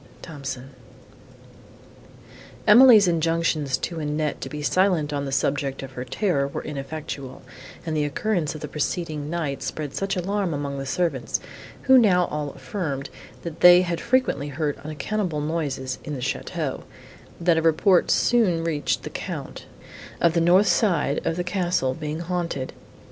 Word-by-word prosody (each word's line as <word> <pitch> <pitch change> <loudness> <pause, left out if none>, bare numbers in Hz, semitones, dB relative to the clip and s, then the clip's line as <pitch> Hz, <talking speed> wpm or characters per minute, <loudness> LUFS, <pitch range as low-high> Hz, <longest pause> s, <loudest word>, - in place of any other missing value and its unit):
THOMSON 135 -4 -7 1.9
Emily's 220 -2 +8
injunctions 165 -4 +1
to 170 -2 -4
Annette 150 0 -2
to - - -5
be 150 -1 -6
silent 170 -2 +2
on 140 -1 -2
the 135 - -4
subject 135 0 -1
of 135 - -8
her 125 -1 -6
terror 140 -1 0
were 140 - -5
ineffectual, 140 -2 -6 0.4
and 160 -2 -2
the 150 - +1
occurrence 165 +1 -1
of 155 - -8
the 150 - -4
preceding 150 0 -3
night 155 -5 -3
spread 150 -3 -4
such 195 0 -2
alarm 190 -2 -1
among 140 -1 -4
the 135 - -5
servants, 165 -6 -1 0.4
who 265 -1 +7
now 180 -6 +4
all 150 -1 -2
affirmed, 145 -8 -4 0.3
that 165 -2 -6
they 180 0 +8
had 170 -2 -2
frequently 240 - +1
heard 145 +1 -2
unaccountable 160 +2 -2
noises 145 -5 -3
in 150 - -5
the - - -5
château, 125 - -3 0.6
that 170 -1 +3
a - - -1
report 165 +3 +3
soon 195 -9 +3
reached 155 -3 -1
the - - -6
Count - - -6 0.5
of 170 -1 +3
the 170 - +2
north 180 +4 +5
side 170 -9 +2
of 165 - -1
the 180 - -2
castle 175 -8 0
being 155 +2 -5
haunted. 170 -6 -3
155 Hz, 155 wpm, -24 LUFS, 145-180 Hz, 1.9 s, Emily's